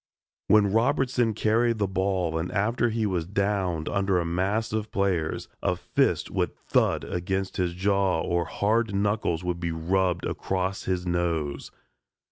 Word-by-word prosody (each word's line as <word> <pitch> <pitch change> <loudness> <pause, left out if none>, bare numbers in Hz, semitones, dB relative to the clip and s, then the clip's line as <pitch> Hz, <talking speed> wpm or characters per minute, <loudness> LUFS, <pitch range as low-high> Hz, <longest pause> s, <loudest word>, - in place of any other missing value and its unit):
When 105 -2 +4
Robertson 120 0 +2
carried 115 +2 +2
the 100 -2 +1
ball 95 -3 0
and 85 - -3
after 115 +4 +1
he 110 -1 -1
was 90 -5 -1
downed 95 -4 -1
under 100 -2 +1
a 85 - -1
mass 100 +7 -1
of 110 -1 -2
players, 95 -5 -1
a - - +1
fist - - 0
would - - -1
thud - - +1
against 95 +2 -3
his 90 -2 0
jaw 95 -2 +1
or 85 +1 0
hard 110 0 0
knuckles 100 -4 0
would 90 -1 -2
be 85 -1 -2
rubbed 90 +2 0
across 95 0 -2
his 90 -1 -1
nose. 85 -5 -1
95 Hz, 150 wpm, -26 LUFS, 85-105 Hz, -, When